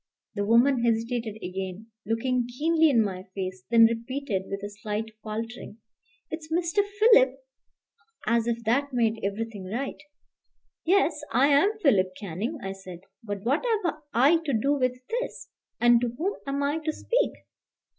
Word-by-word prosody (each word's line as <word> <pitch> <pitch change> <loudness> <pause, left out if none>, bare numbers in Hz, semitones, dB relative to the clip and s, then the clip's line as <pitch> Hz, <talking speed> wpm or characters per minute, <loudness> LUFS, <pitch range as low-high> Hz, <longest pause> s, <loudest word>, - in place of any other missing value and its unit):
The 205 -2 -2
woman 235 +4 +4
hesitated 230 -1 0
again, 190 +4 -6 0.2
looking 240 +2 0
keenly 320 +6 +3
in 235 -5 +4
my 185 -2 -4
face, 185 -1 -4
then 230 -1 +7
repeated 230 -3 -2
with 195 0 -5
a 205 - -4
slight 210 +1 -4
faltering, 225 0 -6 0.5
"It's 320 0 -6
Mr. 345 +4 +2
Philip?" 405 - +4 0.9
as 235 +1 +2
if 235 0 -1
that 270 +5 +1
made 225 -2 +1
everything 205 0 -3
right. 245 +11 -4 0.8
"Yes; 360 -2 +2
I 260 +5 +4
am 350 +10 +4
Philip 190 - +3
Canning," 210 - -4
I 195 - -3
said; 185 -3 -10 0.2
"but 205 -3 -5
what 275 - +1
have 435 -8 +1 0.2
I 280 +8 +5
to 320 -4 -3
do 260 +6 +2
with 255 -3 0
this? - - -4 0.3
and 240 -1 +5
to 245 - 0
whom 385 +7 0
am 280 +1 -1
I 290 +3 0
to 310 0 -2
speak?" - - 0
235 Hz, 155 wpm, -27 LUFS, 215-290 Hz, 0.9 s, then